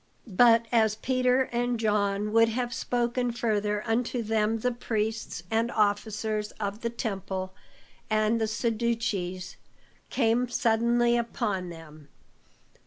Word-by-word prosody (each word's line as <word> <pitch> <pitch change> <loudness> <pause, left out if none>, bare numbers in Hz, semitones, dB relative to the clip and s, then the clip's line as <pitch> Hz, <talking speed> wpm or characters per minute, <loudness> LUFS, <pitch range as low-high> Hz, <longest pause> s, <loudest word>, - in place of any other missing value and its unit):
But 230 +1 +5
as 220 -3 +3
Peter 255 +2 +2
and 240 0 0
John 210 -1 0
would 230 0 +5
have 240 +1 -2
spoken 245 0 -1
further 210 -3 -1
unto 235 +1 0
them, 220 0 0
the 250 - +1
Priests 220 -6 -3
and 225 +1 +1
officers 210 0 0
of 205 +1 -4
the 235 - -1
temple 190 -5 -4 0.6
and 215 +1 +2
the 220 - +1
Sadducees 215 -5 -2 0.5
came 240 0 +1
suddenly 235 +1 +2
upon 200 -6 -2
them. 155 -3 -12
225 Hz, 115 wpm, -27 LUFS, 210-235 Hz, 0.6 s, But